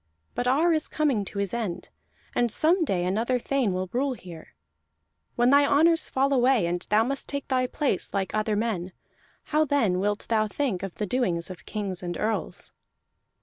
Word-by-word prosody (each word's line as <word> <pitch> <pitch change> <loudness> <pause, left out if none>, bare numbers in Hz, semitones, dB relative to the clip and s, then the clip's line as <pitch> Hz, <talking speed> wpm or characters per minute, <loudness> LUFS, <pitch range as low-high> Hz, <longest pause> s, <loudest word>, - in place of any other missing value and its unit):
But 245 - -2
Ar 315 +7 +3
is 310 -1 0
coming 280 -9 0
to 200 - -8
his 200 -2 -1
end, 220 -7 -4 0.4
and 240 -2 +1
some 335 - +3
day 185 - 0
another 225 +7 0
thane 250 -3 0
will 185 +1 -2
rule 265 +2 0
here. 175 -8 -12 0.8
When 240 +2 +3
thy 285 +1 +6
honors 320 +3 +3
fall 275 +1 +1
away, 250 -5 +3
and 175 +1 -1
thou 215 +1 +4
must 275 +3 -3
take 280 -1 -4
thy 255 -2 +1
place 265 - 0
like 195 -2 -2
other 215 0 0
men: 200 -5 -2 0.5
how 305 0 +1
then 235 -11 +1
wilt 205 +2 -1
thou 215 -2 +2
think 220 -5 -2
of 195 -3 -6
the 210 - -2
doings 185 -6 -1
of 175 -3 -12
kings 200 -4 -3
and 175 -1 -4
earls?" 220 +1 -3
225 Hz, 185 wpm, -26 LUFS, 190-275 Hz, 0.8 s, thy